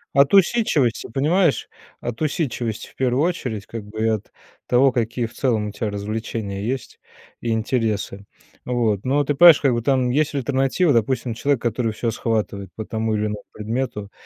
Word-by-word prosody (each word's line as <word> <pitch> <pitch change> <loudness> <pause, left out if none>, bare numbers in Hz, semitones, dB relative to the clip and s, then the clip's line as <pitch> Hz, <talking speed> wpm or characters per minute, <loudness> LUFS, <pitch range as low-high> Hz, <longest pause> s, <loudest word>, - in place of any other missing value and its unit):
От 140 +3 +5
усидчивости, 175 - +3
понимаешь. 155 +4 +2 0.3
От 120 +2 -5
усидчивости, 125 -8 -2
в - - -20
первую 130 +2 +1
очередь, 125 - -2
как 115 -2 -7
бы 110 +2 -4
от 110 -2 -2 0.4
того 130 +2 +4
какие 120 -1 -1
в 115 - -9
целом 115 -5 0
у - - -5
тебя 105 +1 -3
развлечения 105 -1 -4
есть, 130 +4 -4 0.4
и 120 - -3
интересы. 110 -3 -1 0.4
Вот. 115 -5 0
Но 145 +3 +2
ты 145 - 0
понимаешь, 165 +1 +8
как 135 -4 +3
бы 115 - -1
там, 130 0 +1
есть, 150 +1 +1
альтернатива. 135 +4 +1
Допустим 120 +1 0
человек 140 +2 0
который 115 -1 0
всё 115 +1 -2
схватывает 105 -4 -2
по 110 - -5
тому 110 0 -1
или 105 0 0
иному 105 -1 -4
предмету, 105 -2 -4
120 Hz, 170 wpm, -22 LUFS, 110-135 Hz, 0.4 s, понимаешь